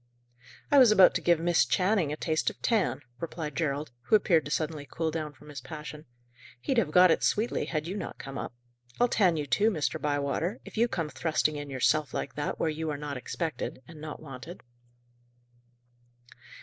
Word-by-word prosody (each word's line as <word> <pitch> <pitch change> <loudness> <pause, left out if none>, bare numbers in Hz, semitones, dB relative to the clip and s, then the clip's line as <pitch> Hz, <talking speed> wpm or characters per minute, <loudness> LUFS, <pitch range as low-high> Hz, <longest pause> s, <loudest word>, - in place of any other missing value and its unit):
"I 285 - +7
was 250 -4 +8
about 195 -3 +7
to - - -1
give 170 -2 +3
Miss 170 0 +3
Channing 180 - +1
a 150 - -3
taste 160 -1 0
of - - -12
tan," 190 - +1 0.2
replied 160 -3 -5
Gerald, 150 -2 -1
who - - +4
appeared 170 -6 +3
to - - -5
suddenly 150 -2 -2
cool 160 -1 -2
down 155 -2 -3
from 150 +2 -17
his 140 -3 -7
passion. 150 +1 -8 0.5
"He'd 240 - +1
have 195 - 0
got 180 +2 +6
it - - +2
sweetly, 220 +3 +1
had 155 -2 -2
you 180 +4 -4
not 205 - -5
come 135 0 -8
up. 125 - -5 0.4
I'll 245 - +5
tan 185 -8 +3
you 150 - -2
too, 200 - +3
Mr. 160 -9 -2
Bywater, 145 - -1
if - - -11
you 230 +2 +3
come 165 -9 -3
thrusting 155 -1 0
in 145 -1 -6
yourself, 145 +3 +1
like 135 - -3
that, 145 +3 -3
where - - +1
you 160 0 -2
are 150 - -2
not 145 -1 -5
expected, 130 0 -4
and 160 -2 -12
not 155 -1 -7
wanted." 145 +4 -10
155 Hz, 195 wpm, -29 LUFS, 145-175 Hz, 0.5 s, was